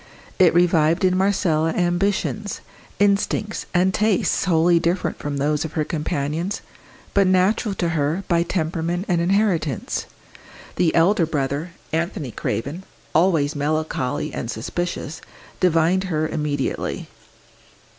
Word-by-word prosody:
It 175 -3 +5
revived 170 0 +3
in 185 0 +3
Marcella 175 -5 +1
ambitions, 195 +3 -1 0.4
instincts 205 +1 +1
and 185 +1 +2
tastes 215 -1 +1
wholly 170 -1 +4
different 175 +3 -1
from 145 -1 -3
those 150 +2 0
of 160 - -6
her 155 - 0
companions, 155 +4 -2 0.5
but 200 -1 +4
natural 195 +3 +2
to 175 -2 0
her 160 +3 0
by 170 -2 +3
temperament 170 +1 -1
and 175 -4 +1
inheritance. 175 - 0 0.7
The 175 -3 +2
elder 170 0 +4
brother, 145 +2 -2 0.2
Anthony 160 -5 -2
Craven, 140 - -3 0.3
always 160 -3 +3
melancholy 145 -2 -1
and 115 - -4
suspicious, 160 +6 -4 0.4
divined 180 +2 +3
her 155 -4 0
immediately. 150 -3 -2
170 Hz, 115 wpm, -22 LUFS, 155-185 Hz, 0.7 s, It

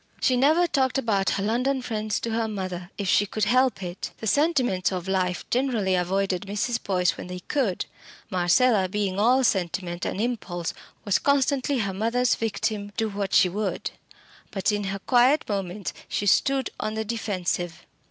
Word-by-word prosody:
She 255 - +3
never 305 +7 +4
talked 265 -5 +1
about 210 -7 +1
her 195 - -1
London 250 +6 +1
friends 215 -3 -2
to 230 - -3
her 225 0 0
mother, 185 -4 -5
if 200 - -3
she 205 +3 +3
could 215 +2 -2
help 250 -2 +2
it. 180 +1 -5
The - - -7
sentiments 250 - +2
of 185 -1 -4
life 185 -1 -1
generally 240 -7 +1
avoided 190 +1 0
Mrs. 225 +4 -1
Boyce 180 -3 +1
when - - -7
they 180 0 -6
could. 230 -6 -1 0.5
Marcella 185 +3 +3
being 200 -1 -1
all 250 +5 +4
sentiment 180 -4 -1
and - - -2
impulse, 200 -7 -2 0.3
was 200 -2 +2
constantly 280 -1 +2
her 195 -2 -2
mother's 230 +5 +1
victim, 210 -2 -2
do 225 -1 0
what 200 -1 -3
she - - +6
would. 200 +2 -3 0.6
But 195 +2 0
in 205 -1 -1
her 195 +1 -2
quiet 250 +8 +3
moments 195 -1 -3 0.2
she 205 - -1
stood 270 +6 +2
on 215 0 -2
the 220 0 -2
defensive. 180 -6 -3
205 Hz, 170 wpm, -25 LUFS, 190-245 Hz, 0.6 s, she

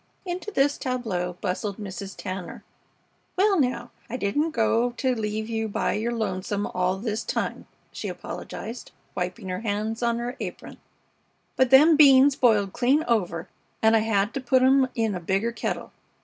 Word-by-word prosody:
Into 365 +3 -4
this 285 -7 +1
tableau 220 -9 -2
bustled 200 +1 -2
Mrs. 195 -1 -7
Tanner. 185 -1 -6 0.7
"Well, 390 0 +3
now, 245 -3 -1 0.2
I 250 - -3
didn't 260 +9 0
go 235 -2 +1
to 260 +1 0
leave 215 -1 -3
you 225 -1 -2
by 205 - -1
your 220 +3 -1
lonesome 205 -2 -2
all 180 +1 -1
this 215 +1 -3
time," - - -3 0.2
she - - -6
apologized, 230 +3 -7 0.2
wiping 180 +1 -4
her 185 0 -3
hands 220 +1 -2
on 235 -1 +1
her 240 +2 -4
apron, - - -7 0.8
"but 260 -1 +3
them 300 +4 +7
beans 275 -2 +7
boiled 210 -7 +3
clean 265 +5 +2
over, 185 -7 0 0.4
and 220 0 +5
I - - +5
hed 215 -1 +1
to 275 - -3
put 255 0 +3
'em 265 0 +5
in 225 -3 0
a 180 - -3
bigger 195 +7 0
kettle. 235 - -4
225 Hz, 165 wpm, -25 LUFS, 200-255 Hz, 0.8 s, them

